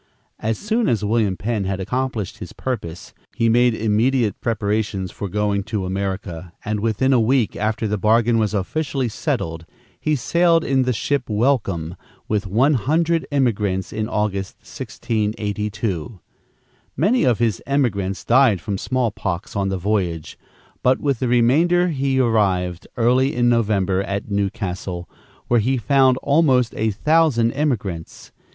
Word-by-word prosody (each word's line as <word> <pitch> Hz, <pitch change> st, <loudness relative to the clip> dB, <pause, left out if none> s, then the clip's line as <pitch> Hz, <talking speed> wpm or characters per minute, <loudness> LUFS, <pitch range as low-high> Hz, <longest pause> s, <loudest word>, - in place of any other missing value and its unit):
As 110 Hz, 0 st, -1 dB
soon 220 Hz, +2 st, 0 dB
as 105 Hz, -3 st, 0 dB
William 105 Hz, -3 st, +1 dB
Penn 110 Hz, -2 st, -2 dB
had 95 Hz, 0 st, -2 dB
accomplished 125 Hz, 0 st, -3 dB
his -, -, -8 dB
purpose, 100 Hz, -10 st, -5 dB, 0.2 s
he 115 Hz, -1 st, +2 dB
made 120 Hz, 0 st, +4 dB
immediate 110 Hz, +1 st, +1 dB
preparations 105 Hz, -4 st, -1 dB
for 100 Hz, -, -5 dB
going 105 Hz, +1 st, 0 dB
to 100 Hz, -4 st, -3 dB
America, 95 Hz, -2 st, -4 dB
and 105 Hz, 0 st, -1 dB
within 115 Hz, +5 st, +1 dB
a 125 Hz, -, +4 dB
week 120 Hz, 0 st, +2 dB
after 110 Hz, +1 st, -1 dB
the 105 Hz, 0 st, -1 dB
bargain 115 Hz, +2 st, +3 dB
was 110 Hz, -1 st, 0 dB
officially 130 Hz, +6 st, -1 dB
settled, 100 Hz, -, -3 dB, 0.4 s
he 155 Hz, -1 st, +1 dB
sailed 165 Hz, +5 st, +2 dB
in 135 Hz, -1 st, +1 dB
the 125 Hz, -, +1 dB
ship 130 Hz, +3 st, -1 dB
Welcome, 105 Hz, -, 0 dB, 0.3 s
with 105 Hz, -2 st, -1 dB
one 125 Hz, +10 st, +3 dB
hundred 160 Hz, +6 st, +1 dB
emigrants, 105 Hz, -9 st, 0 dB
in 110 Hz, 0 st, -2 dB
August, 100 Hz, -2 st, -2 dB
1682. 105 Hz, -3 st, -3 dB, 0.8 s
Many 205 Hz, -, +2 dB
of 125 Hz, -4 st, +3 dB
his 115 Hz, -5 st, 0 dB
emigrants 100 Hz, -9 st, -1 dB
died 120 Hz, -5 st, +4 dB
from 100 Hz, +1 st, -4 dB
small 125 Hz, -3 st, 0 dB
pox 90 Hz, -3 st, -4 dB
on 100 Hz, -1 st, 0 dB
the 95 Hz, -, -1 dB
voyage; 90 Hz, -5 st, -2 dB, 0.5 s
but 130 Hz, +1 st, +3 dB
with 140 Hz, -5 st, 0 dB
the 130 Hz, -, 0 dB
remainder 160 Hz, +10 st, +3 dB
he 135 Hz, -3 st, 0 dB
arrived, 95 Hz, -8 st, +1 dB
early 125 Hz, +4 st, +2 dB
in 120 Hz, 0 st, +3 dB
November, 100 Hz, -5 st, +1 dB
at 100 Hz, +1 st, -4 dB
New 100 Hz, -1 st, +1 dB
Castle, 95 Hz, -4 st, -5 dB, 0.4 s
where 120 Hz, -, +3 dB
he 130 Hz, +5 st, +1 dB
found 130 Hz, +2 st, +3 dB
almost 135 Hz, -5 st, +3 dB
a 110 Hz, -, 0 dB
thousand 135 Hz, 0 st, +2 dB
emigrants. 105 Hz, -, -3 dB
110 Hz, 145 wpm, -21 LUFS, 100-130 Hz, 0.8 s, made